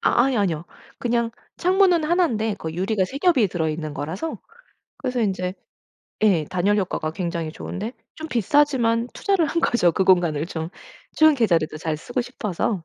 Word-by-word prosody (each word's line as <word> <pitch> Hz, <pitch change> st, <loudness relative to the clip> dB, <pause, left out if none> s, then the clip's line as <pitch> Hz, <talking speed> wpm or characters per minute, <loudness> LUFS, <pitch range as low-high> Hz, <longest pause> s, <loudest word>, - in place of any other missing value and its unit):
아 240 Hz, -, +3 dB
아이 265 Hz, -3 st, +1 dB
아니요. 175 Hz, -6 st, 0 dB, 0.3 s
그냥 235 Hz, -1 st, 0 dB, 0.3 s
창문은 365 Hz, -3 st, +3 dB
1 345 Hz, +2 st, +3 dB
인데 220 Hz, -4 st, -1 dB
그 160 Hz, -, -5 dB
유리가 190 Hz, +3 st, 0 dB
3 270 Hz, +9 st, -6 dB
겹이 280 Hz, -, +3 dB
들어있는 155 Hz, -3 st, -2 dB
거라서 160 Hz, -, -4 dB, 0.6 s
그래서 250 Hz, -3 st, -2 dB
인제 185 Hz, -3 st, -1 dB, 0.7 s
예 190 Hz, -8 st, +4 dB
단열 185 Hz, +6 st, +1 dB
효과가 160 Hz, -4 st, -2 dB
굉장히 170 Hz, -3 st, -3 dB
좋은데 215 Hz, +8 st, -5 dB, 0.2 s
좀 315 Hz, 0 st, -7 dB
비싸지만 240 Hz, -1 st, +2 dB
투자를 390 Hz, -5 st, +1 dB
한 335 Hz, +3 st, -1 dB
거죠. 180 Hz, -, +3 dB
그 190 Hz, -, +1 dB
공간을 170 Hz, -5 st, +3 dB
좀 160 Hz, -2 st, -4 dB, 0.5 s
좋은 315 Hz, -1 st, +6 dB
계절에도 170 Hz, -, +1 dB
잘 155 Hz, -1 st, -2 dB
쓰고 245 Hz, -, -3 dB
싶어서. 210 Hz, -6 st, -3 dB
210 Hz, 330 characters per minute, -23 LUFS, 170-260 Hz, 0.7 s, 좋은